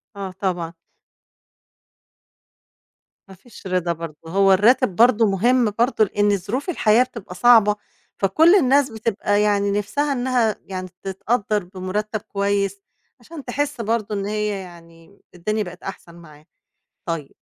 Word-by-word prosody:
آه، 195 Hz, -2 st, -5 dB
طبعًا. 175 Hz, -4 st, -2 dB, 2.5 s
ما 190 Hz, -, -13 dB
فيش 195 Hz, 0 st, -13 dB
رضا 180 Hz, -2 st, 0 dB
برضه 165 Hz, -2 st, -8 dB
هو 195 Hz, +3 st, +4 dB
الراتب 215 Hz, +1 st, +3 dB
برضه 230 Hz, 0 st, +5 dB
مهم 235 Hz, +4 st, +2 dB
برضه، 235 Hz, -2 st, +3 dB
لإن 205 Hz, 0 st, +1 dB
ظروف 235 Hz, -, -4 dB
الحياة 235 Hz, -8 st, +3 dB
بتبقى 230 Hz, -8 st, -10 dB
صعبة، 215 Hz, 0 st, +5 dB, 0.4 s
فكل 320 Hz, -, +5 dB
الناس 280 Hz, -4 st, +3 dB
بتبقى 210 Hz, -2 st, -1 dB
يعني 200 Hz, -1 st, +1 dB
نِفْسها 245 Hz, +9 st, -1 dB
إنّها 245 Hz, -4 st, +1 dB
يعني 185 Hz, -1 st, -6 dB
تتقدّر 210 Hz, +1 st, -1 dB
بمرتّب 190 Hz, +4 st, -4 dB
كويس، 200 Hz, 0 st, -2 dB, 0.4 s
عشان 295 Hz, +4 st, -11 dB
تحس 285 Hz, 0 st, -2 dB
برضه 220 Hz, -1 st, -1 dB
إن 200 Hz, -1 st, -3 dB
هي 210 Hz, +1 st, -1 dB
يعني 170 Hz, -2 st, -14 dB
م 200 Hz, -, -24 dB, 0.2 s
الدنيا 215 Hz, +5 st, -2 dB
بقت 180 Hz, -2 st, -11 dB
أحسن 175 Hz, -3 st, -9 dB
معاها. 155 Hz, -3 st, -16 dB, 0.6 s
طيب 165 Hz, -4 st, -4 dB
205 Hz, 130 wpm, -21 LUFS, 185-235 Hz, 2.5 s, برضه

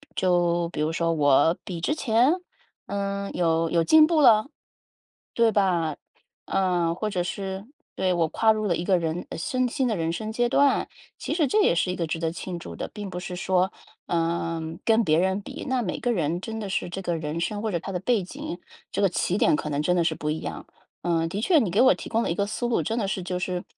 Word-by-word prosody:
就 175 Hz, -2 st, +2 dB
比 170 Hz, -, -7 dB
如 155 Hz, +1 st, 0 dB
说 165 Hz, 0 st, +1 dB
我 145 Hz, +2 st, +4 dB
比 175 Hz, -3 st, -6 dB
之 300 Hz, -, 0 dB
前？ 245 Hz, +1 st, +3 dB, 0.5 s
嗯， 200 Hz, 0 st, -3 dB
有 165 Hz, -1 st, +1 dB
有 170 Hz, -1 st, +3 dB
进 310 Hz, -, +7 dB
步 315 Hz, -1 st, +2 dB
了。 220 Hz, -5 st, +6 dB, 0.9 s
对 230 Hz, -1 st, +4 dB
吧， 175 Hz, -6 st, +1 dB, 0.5 s
呃， 175 Hz, -3 st, +1 dB
或 215 Hz, +5 st, -3 dB
者 180 Hz, -3 st, -1 dB
是， 190 Hz, +1 st, -5 dB, 0.3 s
对， 185 Hz, -1 st, +1 dB
我 170 Hz, -2 st, +2 dB
跨 220 Hz, +7 st, +3 dB
入 215 Hz, -1 st, 0 dB
了 175 Hz, -, +1 dB
一 170 Hz, -, -3 dB
个 185 Hz, 0 st, +3 dB
人 165 Hz, 0 st, -2 dB
呃， -, -, -6 dB
生 255 Hz, +9 st, 0 dB
新 255 Hz, +2 st, 0 dB
的 220 Hz, -, 0 dB
人 165 Hz, -2 st, -1 dB
生 215 Hz, +5 st, -4 dB
阶 240 Hz, +1 st, +1 dB
段， 280 Hz, +1 st, +3 dB, 0.3 s
其 -, -, -3 dB
实 315 Hz, -3 st, +2 dB
这 425 Hz, +6 st, +3 dB
也 -, -, +4 dB
是 175 Hz, +2 st, +1 dB
一 180 Hz, -, -1 dB
个 170 Hz, -, -2 dB
值 165 Hz, +1 st, -3 dB
得 165 Hz, 0 st, -1 dB
庆 175 Hz, 0 st, -6 dB
祝 -, -, -9 dB
的。 -, -, -5 dB
并 205 Hz, -2 st, -6 dB
不 180 Hz, -, -6 dB
是 180 Hz, 0 st, -5 dB
说， 185 Hz, 0 st, +1 dB, 0.4 s
呃， 165 Hz, -1 st, -1 dB, 0.2 s
跟 225 Hz, 0 st, +3 dB
别 155 Hz, -2 st, +3 dB
人 190 Hz, +2 st, +1 dB
比， -, -, -8 dB
那 260 Hz, -1 st, +1 dB
每 190 Hz, -6 st, -3 dB
个 245 Hz, -, +1 dB
人 170 Hz, -3 st, -1 dB
真 225 Hz, +2 st, -5 dB
的 210 Hz, -, -4 dB
是 185 Hz, -, -2 dB
这 195 Hz, +2 st, -5 dB
个 175 Hz, -2 st, -1 dB
人 155 Hz, +1 st, -4 dB
生 205 Hz, +5 st, -2 dB
或 220 Hz, -, -2 dB
者 170 Hz, -, -1 dB
他 195 Hz, -, -6 dB
的 180 Hz, -, -1 dB
背 230 Hz, +1 st, +2 dB
景， 175 Hz, -1 st, -7 dB, 0.3 s
这 -, -, -1 dB
个 200 Hz, -, +5 dB
起 180 Hz, +1 st, -1 dB
点 -, -, +4 dB
可 150 Hz, -, -4 dB
能 145 Hz, 0 st, -1 dB
真 180 Hz, +4 st, +1 dB
的 175 Hz, -, +2 dB
是 165 Hz, -1 st, +1 dB
不 150 Hz, -, -3 dB
一 155 Hz, +1 st, -1 dB
样。 -, -, -6 dB, 0.4 s
呃， 165 Hz, -1 st, +1 dB
的 195 Hz, -, -3 dB
确 320 Hz, -, +4 dB
你 215 Hz, -10 st, 0 dB
给 205 Hz, +6 st, +3 dB
我 260 Hz, -, +7 dB
提 -, -, -8 dB
供 230 Hz, 0 st, +1 dB
了 -, -, -1 dB
一 170 Hz, -, 0 dB
个 200 Hz, -, 0 dB
思 220 Hz, +4 st, -3 dB
路 240 Hz, -, +1 dB
真 230 Hz, +1 st, -1 dB
的 200 Hz, -, -1 dB
是 190 Hz, -2 st, -2 dB
就 180 Hz, 0 st, -3 dB
是， 180 Hz, -1 st, -3 dB
185 Hz, 265 characters per minute, -25 LUFS, 170-215 Hz, 0.9 s, 进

